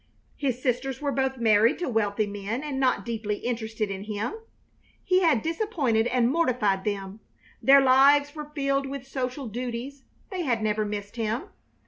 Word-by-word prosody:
His 260 -4 -2
sisters 255 0 -1
were 285 -1 -1
both 265 -1 0
married 225 0 +4
to 355 - -3
wealthy 215 -3 +1
men 205 +5 -4
and 285 -3 -3
not 260 -1 +1
deeply 220 -3 -2
interested 220 -2 -3
in 195 +1 -5
him. 215 - -3 0.7
He 365 0 +3
had 320 -11 +3
disappointed 320 - 0
and 245 0 +2
mortified 245 - +1
them; 200 0 -3 0.4
their 275 +1 +7
lives 275 +2 +5
were 300 -2 -7
filled 275 -1 0
with 270 -1 -6
social 265 0 -4
duties; 245 +4 -5 0.3
they 370 -2 -3
had 240 -8 0
never 215 0 0
missed 205 +1 -5
him. 225 +2 -2
250 Hz, 160 wpm, -26 LUFS, 215-275 Hz, 0.7 s, their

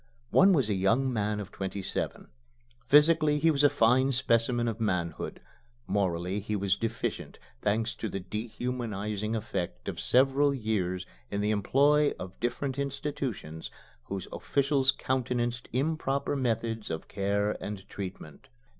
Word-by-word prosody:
One 195 +2 +7
was 140 - +3
a 105 - +1
young 115 +8 +2
man 105 -1 0
of 105 -1 -6
twenty 95 0 -4
seven. - - -4 0.6
Physically 150 0 +5
he 160 +2 +4
was 145 -1 +1
a 145 - +7
fine 130 +4 +4
specimen 120 -2 +2
of 115 -1 -2
manhood; 90 -6 -2 0.5
morally 90 0 0
he 105 +1 -3
was 100 -1 +1
deficient 115 +2 -3 0.2
thanks 110 +2 +1
to 110 - -3
the 95 - -3
dehumanizing 110 0 -3
effect 105 -5 -4
of - - -4
several 135 +2 +3
years 95 -6 -1 0.2
in 100 - -2
the 105 +1 +1
employ 145 +8 +3
of 95 0 -8
different 130 +3 -2
institutions 135 - -4 0.4
whose 95 -2 -5
officials 140 -1 +1
countenanced 120 -2 -1
improper 140 +1 0
methods 115 -4 -1
of 80 -1 -4
care 100 +1 0
and 100 -2 -6
treatment. 95 - -8
115 Hz, 135 wpm, -29 LUFS, 100-135 Hz, 0.6 s, One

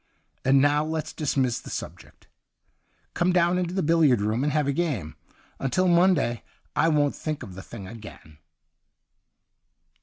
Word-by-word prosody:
And 135 +1 +4
now 145 +2 +3
let's 160 0 -4
dismiss 135 -5 0
the - - -11
subject. - - -8 0.9
Come 175 +1 +1
down 175 0 +2
into 180 0 -2
the 190 - 0
billiard 155 -6 +4
room 110 +5 0
and 150 - +1
have 150 -2 +1
a 140 - +1
game. 135 - -2 0.4
Until 160 +8 +1
Monday 170 - +3 0.3
I - - +3
won't 145 -2 +2
think 155 -2 -4
of 95 - -9
the 95 - -8
thing 100 -2 -10
again.' 105 -8 -12
145 Hz, 150 wpm, -25 LUFS, 120-170 Hz, 0.9 s, And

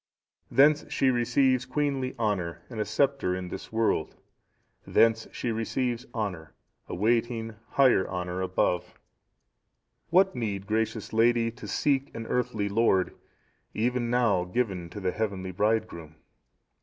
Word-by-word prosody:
"Thence 145 +2 +4
she 135 -1 +3
receives 130 +1 +2
queenly 135 -2 -1
honour 90 -7 -2
and 115 - -6
a 105 - 0
sceptre 135 -4 +1
in 90 -1 -5
this - - -8
world; 110 -8 0 0.7
thence 115 0 +3
she 120 - -3
receives 120 +2 -2
honour, 95 - -4 0.3
awaiting 115 +2 0 0.2
higher 130 -9 +4
honour 90 0 -3
above. 90 -1 0 1.1
"What 190 +2 +4
need, 100 -5 -3
gracious 110 0 -2
lady, 115 +1 +3
to 125 +3 -10
seek 140 -1 +1
an 115 0 -5
earthly 110 -4 -1
lord, 100 -3 +2 0.6
even 120 +1 0
now 120 -7 +2
given 95 -4 -2
to 105 - -8
the 95 -2 -1
Heavenly 100 -3 -3
Bridegroom? 90 -6 -1
115 Hz, 125 wpm, -27 LUFS, 95-125 Hz, 1.1 s, Thence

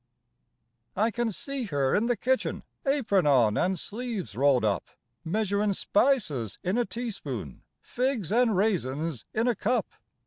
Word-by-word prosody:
I 220 +4 +2
can 240 0 -1
see 275 +5 -4
her 140 -8 0
in 225 +3 +2
the 245 -1 +1
kitchen, 260 +1 0 0.2
Apron 215 - +2
on 120 -7 +4
and 185 - +1
sleeves 220 - -5
rolled 135 -2 +3
up, 105 -2 0 0.4
Measurin' 205 +2 0
spices 160 - +1
in 185 +3 0
a 240 - +2
teaspoon, 180 - -5 0.2
Figs 245 - -1
and 230 -3 +3
raisins 160 - -1
in 225 +3 0
a 245 - +4
cup. 225 +2 0
205 Hz, 140 wpm, -28 LUFS, 145-240 Hz, 0.4 s, on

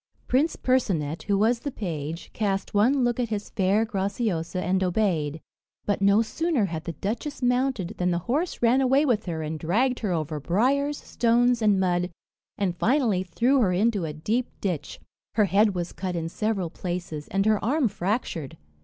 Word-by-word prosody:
Prince 290 +6 +2
Percinet, 175 - 0
who 200 -1 +2
was 230 +4 +2
the 285 - -4
page, 165 - -5
cast 195 -3 -1
one 250 +6 +3
look 240 0 0
at 240 -2 0
his 210 -2 -4
fair 200 +3 +2
Graciosa 195 -4 -2
and 185 +2 +1
obeyed; 170 -6 0 0.5
but 205 -1 0
no 200 +3 +5
sooner 295 0 0
had 165 -2 -5
the 170 - -4
duchess 230 - -4
mounted, 250 -6 +1
than 180 0 +1
the 175 - +1
horse 300 +3 -1
ran 245 +3 +4
away 270 +3 +3
with 230 -6 +1
her 160 -2 -3
and 155 +1 -4
dragged 240 - +1
her 210 -5 -2
over 155 -2 -2
briers, 270 - +1
stones, 240 0 +2
and 205 -3 +3
mud, 180 -1 +1 0.5
and 190 -4 0
finally 235 - +2
threw 235 +10 +2
her 205 -7 +3
into 205 +1 +1
a 160 - -2
deep 220 +11 -1
ditch. 180 -7 -3 0.4
Her 210 -1 +4
head 200 +2 +3
was 175 -1 -3
cut 185 -2 -4
in 165 -1 -2
several 195 -3 -2
places, 175 -5 -5
and 195 +1 0
her 215 -1 +2
arm 270 +4 +2
fractured. 195 - -3
200 Hz, 180 wpm, -26 LUFS, 175-240 Hz, 0.5 s, no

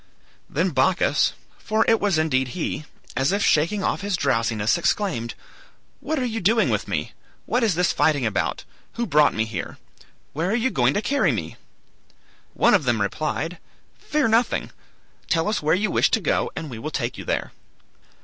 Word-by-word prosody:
"Then 175 +5 0
Bacchus 165 +6 +2 0.3
(for 220 0 +1
it 225 - +4
was 200 -5 +1
indeed 130 -3 0
he), 155 -2 -3 0.3
as 135 +4 +1
if 200 +1 +1
shaking 170 +7 +2
off - - -1
his 200 -2 -1
drowsiness, 115 -6 +1
exclaimed, 170 - -1 0.6
'What 315 - -2
are 255 - 0
you 225 -2 -3
doing 220 +5 +3
with - - -1
me? - - -2 0.3
What 245 - 0
is 210 -7 +2
this 180 +1 +2
fighting 145 -5 +2
about? 105 -3 -1 0.3
Who 235 - -2
brought 150 -6 +3
me 110 +1 +1
here? 110 -5 -6 0.6
Where 165 +5 -1
are 215 - +1
you 245 +2 +1
going - - +2
to 205 - 0
carry 285 0 +2
me?' - - -4 1.0
One - - +4
of 185 -9 +3
them 120 -3 +1
replied, 155 - -2 0.4
'Fear 300 -5 0
nothing; 230 +2 +1 0.6
tell 165 +2 +1
us 210 0 0
where 155 +2 +3
you 210 +4 0
wish - - +3
to - - +2
go - - 0
and 155 -4 -6
we 115 - -7
will 135 - -4
take 125 -5 -3
you - - -6
there.' - - -2
170 Hz, 180 wpm, -23 LUFS, 135-215 Hz, 1.0 s, it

